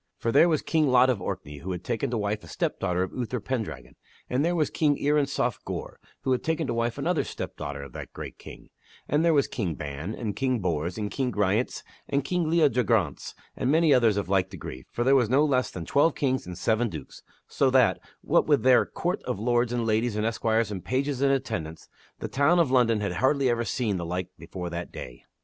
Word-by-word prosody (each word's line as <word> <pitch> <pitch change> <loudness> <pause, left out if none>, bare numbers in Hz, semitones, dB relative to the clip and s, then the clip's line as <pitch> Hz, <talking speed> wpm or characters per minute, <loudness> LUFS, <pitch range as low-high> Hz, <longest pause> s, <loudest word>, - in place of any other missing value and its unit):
For 115 - -1
there 155 +7 +6
was 155 -3 +1
King 155 -2 +2
Lot 130 0 +5
of 110 -7 -3
Orkney, 90 -7 -5
who 95 +6 -5
had 90 0 -6
taken 105 - -2
to 120 - -1
wife 105 0 -2
a - - -12
step - - -2
daughter 90 -1 0
of 95 - -5
Uther 125 0 -3
Pendragon, 115 0 -5 0.4
and 130 +3 +2
there 175 +2 +1
was 155 -3 +1
King 145 -3 +2
Uriensof 140 -5 0
Gore, - - -6 0.2
who 130 - -1
had 125 -2 +1
taken 160 0 0
to 120 - -2
wife 115 +1 -1
another 165 +4 0
step - - -6
daughter 70 -1 -5
of 70 -3 -11
that - - -8
great - - -8
king, - - -12 0.4
and 150 +2 +2
there 165 -2 +4
was 140 - +3
King 90 -9 -3
Ban, 75 +8 -5
and 110 -4 -4
King 130 -2 0
Bors, 85 -2 -2
and 105 -1 -3
King 130 -2 -1
Ryance, 105 +3 0 0.3
and 140 -1 +1
King 175 +2 -1
Leodegrance 125 - +1 0.2
and - - -1
many 160 0 +4
others 115 -5 +4
of 100 - -1
like 95 -1 +1
degree, 65 -6 -8
for 120 - -1
there 135 +2 +4
were 125 -4 +4
no 135 +6 +4
less 130 -4 +1
than 85 -3 -7
twelve 145 - +3
kings 130 -7 -1
and 90 -1 -7
seven 115 +3 +1
dukes, 75 -7 -9 0.3
so - - +2
that, - - +4 0.2
what - - +2
with - - +3
their - - +5
court - - -2
of - - -2
lords 120 +2 +1
and 120 -1 -1
ladies 110 +1 +1
and 105 0 0
esquires 115 -1 0
and 95 -3 -5
pages 135 +1 -1
in 140 - +4
attendance, 110 -13 -2 0.3
the - - -5
town 145 +6 +3
of 165 -7 +3
London 115 -4 +3
had 100 - -1
hardly 135 0 +2
ever 120 0 0
seen 105 -2 -1
the 85 - -4
like 90 +1 -3
before 90 -2 -6
that 85 0 -5
day. 60 -1 -9
120 Hz, 225 wpm, -27 LUFS, 95-135 Hz, 0.4 s, there